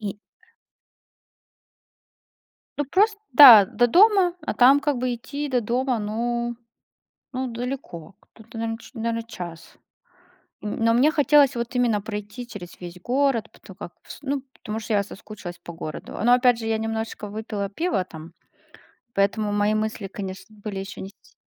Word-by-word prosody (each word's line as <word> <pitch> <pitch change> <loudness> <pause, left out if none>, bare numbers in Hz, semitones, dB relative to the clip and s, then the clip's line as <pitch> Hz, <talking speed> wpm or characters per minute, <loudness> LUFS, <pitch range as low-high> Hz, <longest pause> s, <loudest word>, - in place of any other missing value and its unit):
И. 205 -1 -5 2.6
Ну, 290 - +1
просто, 410 +8 +2
да, 240 -6 +11
до 240 +4 +2
дома, 375 - +5
а - - -4
там 270 +3 +6
как 290 -3 0
бы 250 0 -1
идти 285 +5 -5
до 250 -2 +1
дома 245 +2 0
ну 235 +3 -2 0.8
ну, 260 0 -2
далеко, 230 - -6
к - - -30
это, 225 +1 -12
наверно, 225 0 -3
ч 225 - -15
наверно, 230 -1 -2
час. 175 -7 -9 0.9
М, 210 +2 -3
но 230 - +4
мне 275 +6 +4
хотелось 290 -3 +4
вот 235 +1 -4
именно 235 -4 +2
пройти 210 +3 -7
через 180 -7 -10
весь 175 0 -9
город, 250 0 0
потому 190 - -15
как 175 -3 -9
вс - - -11
ну, 280 -1 -2
потому 215 -1 -6
что 220 +1 -5
я 200 - +3
соскучилась 195 -3 -10
по 170 0 -10
городу. 155 -2 -7
А, - - -4
ну 245 - +5
опять 250 -1 +4
же, 225 - -5
я 220 0 0
немножечко 220 -1 -4
выпила 210 -1 -4
пива 265 - -1
там, 160 -1 -11 0.8
поэтому 205 +1 +1
мои 205 +1 +2
мысли, 215 -2 -2
конечно, 190 -1 -7
были 205 -1 -6
еще 195 +1 -8
не 190 - -7
ть 205 - -26
225 Hz, 165 wpm, -24 LUFS, 205-250 Hz, 2.6 s, да